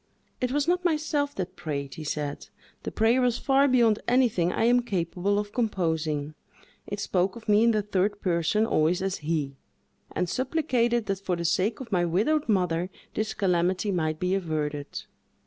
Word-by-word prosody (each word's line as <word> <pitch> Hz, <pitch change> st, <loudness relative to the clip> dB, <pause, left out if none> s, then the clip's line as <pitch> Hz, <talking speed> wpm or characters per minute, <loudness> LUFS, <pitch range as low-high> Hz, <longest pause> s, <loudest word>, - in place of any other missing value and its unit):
"It 250 Hz, 0 st, 0 dB
was 290 Hz, +2 st, 0 dB
not 355 Hz, +1 st, +1 dB
myself 305 Hz, -4 st, 0 dB
that 185 Hz, -1 st, -4 dB
prayed," 140 Hz, -3 st, -4 dB
he 155 Hz, -, -7 dB
said, 145 Hz, -1 st, -4 dB, 0.3 s
"the -, -, -5 dB
prayer 230 Hz, +4 st, +3 dB
was 245 Hz, -2 st, +2 dB
far 275 Hz, 0 st, +3 dB
beyond 235 Hz, -5 st, +4 dB
anything 235 Hz, -9 st, +3 dB
I -, -, 0 dB
am 240 Hz, +2 st, +5 dB
capable 190 Hz, -2 st, -1 dB
of 205 Hz, 0 st, -3 dB
composing—it 165 Hz, -, -3 dB
spoke 190 Hz, -1 st, 0 dB
of 230 Hz, -, -11 dB
me 210 Hz, +1 st, +5 dB
in -, -, +5 dB
the 215 Hz, -2 st, +1 dB
third 205 Hz, 0 st, 0 dB
person, 175 Hz, +4 st, +1 dB
always 175 Hz, -1 st, +1 dB
as 195 Hz, 0 st, -1 dB
he; 150 Hz, -3 st, -2 dB, 0.5 s
and 180 Hz, +2 st, -1 dB
supplicated 245 Hz, -, 0 dB
that 195 Hz, -1 st, -2 dB
for 185 Hz, -2 st, -1 dB
the 170 Hz, 0 st, -4 dB
sake 200 Hz, +7 st, +1 dB
of 235 Hz, -4 st, -9 dB
my 180 Hz, -3 st, +2 dB
widowed 225 Hz, -, +1 dB
mother 180 Hz, -3 st, +1 dB, 0.2 s
this 215 Hz, 0 st, -2 dB
calamity 185 Hz, +1 st, +1 dB
might 155 Hz, -4 st, -1 dB
be 180 Hz, +1 st, 0 dB
averted. 155 Hz, -6 st, -3 dB
195 Hz, 170 wpm, -27 LUFS, 170-235 Hz, 0.5 s, am